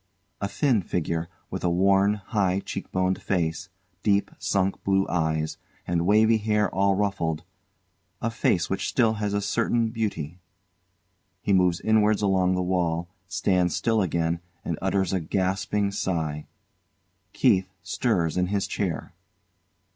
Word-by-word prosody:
A 100 - 0
thin 125 -1 +2
figure, 85 -1 -2 0.2
with 95 - -4
a 90 - +2
worn, 95 +3 +3
high 100 -2 0
cheek 95 - -6
boned 95 0 0
face, 85 -1 -1 0.3
deep 100 -1 +2
sunk 95 -1 0
blue 95 0 +2
eyes 80 -2 -1 0.3
and 85 0 0
wavy 110 +2 +5
hair 105 -1 +1
all 100 +1 +3
ruffled 90 -6 -1 0.8
a 115 - -1
face 95 -5 +1
which 95 0 -2
still 115 -3 +3
has 100 -1 0
a 100 - +1
certain 115 +2 +1
beauty. 95 -8 -3 1.0
He 100 - +2
moves 90 -2 +3
inwards 110 -1 +3
along 95 -2 +2
the 90 - 0
wall, 85 -2 0 0.2
stands 90 -3 +1
still 110 -2 +1
again 85 -2 0 0.3
and 85 - -2
utters 95 0 0
a 95 - +2
gasping 95 +3 0
sigh. 80 -6 -2 0.9
KEITH 95 0 +3
stirs 90 -5 0
in 90 0 +2
his 100 +1 0
chair. 95 -6 -3
95 Hz, 140 wpm, -26 LUFS, 85-105 Hz, 1.0 s, wavy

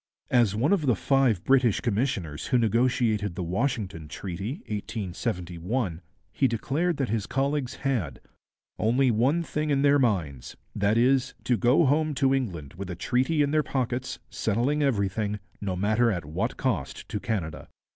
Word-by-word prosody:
As 115 -5 +4
one 135 - +2
of 160 -8 +1
the 125 - +4
five 130 -5 +2
British 130 -5 +3
commissioners 100 - -2
who 125 - +3
negotiated 115 -3 +1
the 90 - -3
Washington 95 - -2
Treaty 95 - -5
(1871), 95 -2 -3 0.3
he 135 - +3
declared 145 +8 -1
that 135 -3 -1
his 105 -1 -1
colleagues 135 -1 -1
had 115 - -2 0.6
'only 125 +4 +3
one 135 +10 +2
thing 150 -1 -2
in 140 -1 +2
their 145 0 +5
minds 85 - -1 0.2
that 100 +2 +2
is, 130 +2 +2
to 125 - +2
go 125 +8 +4
home 150 +2 +2
to 135 0 +3
England 85 - -3
with 95 +2 -7
a 90 - -4
treaty 130 - +1
in 140 - 0
their 155 0 +3
pockets, 130 -3 -2
settling 120 +8 0
everything, 105 -5 0 0.2
no 95 -3 -2
matter 110 +5 +2
at 90 -7 -2
what 75 +2 -2
cost - - -2
to 105 - -3
Canada.' 85 - -3
115 Hz, 155 wpm, -27 LUFS, 100-135 Hz, 0.6 s, their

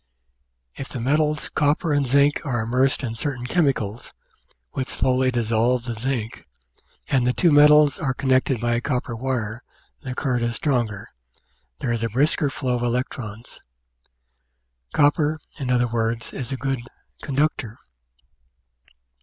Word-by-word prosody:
If 135 - -7
the 130 - -6
metals 150 +4 +1
copper 150 +2 +1
and 145 -2 +1
zinc 140 +3 +3
are 120 -7 -1
im 110 - -6
mersed 130 +2 +2
in 115 -3 -2
certain 125 +1 -3
chemicals, 125 - -1 0.6
which 130 - -3
slowly 130 0 +1
dissolve 120 0 +1
the 120 - -3
zinc, 115 -1 -4 0.6
and 130 -3 +2
the 125 - +2
two 170 +3 +3
metals 150 0 +6
are 135 -5 -1
connected 130 -2 +1
by 120 +1 0
a 115 - 0
copper 125 -3 -2
wire, 120 -2 -3 0.4
the 125 -2 -6
current 125 -3 -1
is 120 0 -1
stronger, 115 -8 -1 0.7
there 120 - -1
is 115 - -2
a 115 - 0
brisker 145 - +2
flow 130 -2 -2
of - - -5
electrons 120 -2 -3
(see - - -14
p. - - -25
270). - - +4
Copper, 150 +1 +2 0.2
in 130 -3 -3
other 125 -1 +2
words, 115 0 -2
is 130 0 -5
a 135 - -2
good 135 -1 -2 0.4
"conductor." 135 -5 -1
125 Hz, 155 wpm, -23 LUFS, 115-140 Hz, 0.7 s, metals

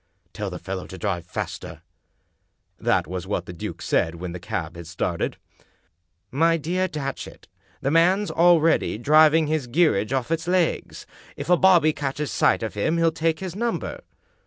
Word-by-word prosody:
"Tell 105 -2 -4
the 90 - -6
fellow 95 +1 -6
to 95 - -9
drive 85 -2 -3
faster." - - -6 1.0
That - - +1
was 90 +1 -6
what - - -2
the 90 - -8
duke 85 - -7
said 80 - +1
when 90 +1 -6
the 90 - -6
cab 85 -1 -4
had 85 -1 -9
started. 85 +1 -2 0.5
" 85 +2 -49
My 165 0 +4
dear 180 +4 -1
Datchet, 145 -5 -6 0.3
the 140 - 0
man's 180 +6 +3
already 165 -7 +3
driving 155 +5 +5
his 155 -4 -1
geer 155 - +3
age 105 +4 -2
off 135 +2 -1
its 165 +1 -1
legs. 180 -2 0 0.3
If - - -3
a - - +8
bobby 175 -4 +5
catches 145 +1 -3
sight - - +2
of 110 - -3
him 155 +11 0
he'll 165 -1 +3
take 160 +1 -1
his 185 -2 -5
number." 235 +2 -3
150 Hz, 175 wpm, -24 LUFS, -, 1.0 s, a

